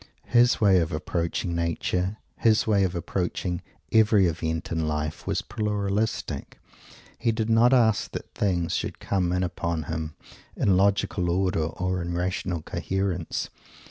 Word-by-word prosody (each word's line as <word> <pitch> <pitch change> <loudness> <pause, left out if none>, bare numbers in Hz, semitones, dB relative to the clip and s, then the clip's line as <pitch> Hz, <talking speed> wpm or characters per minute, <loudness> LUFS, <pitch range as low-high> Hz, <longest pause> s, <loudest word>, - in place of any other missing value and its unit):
His 120 0 +4
way 100 -4 +5
of 80 -2 -1
approaching 85 +2 -2
Nature, 90 +3 -1 0.2
his 110 -1 +3
way 100 -3 +3
of 90 -1 0
approaching 90 0 -2 0.3
every 110 -3 +5
event 80 0 -2
in 80 -1 0
life, 75 0 -3
was - - 0
"pluralistic." 105 0 -2 0.6
He 115 0 +2
did 110 0 -1
not 115 +2 +5
ask 115 -5 +3
that - - -7
things 90 -4 0
should - - -3
come 90 -3 0
in 90 +1 +1
upon 85 -2 -2
him 80 -1 -4 0.4
in 95 - +3
logical 95 -2 +2
order 90 -2 +1
or 90 +3 -2
in 85 0 -3
rational 90 -2 -2
coherence. 95 -3 -2
90 Hz, 140 wpm, -26 LUFS, 85-105 Hz, 0.6 s, way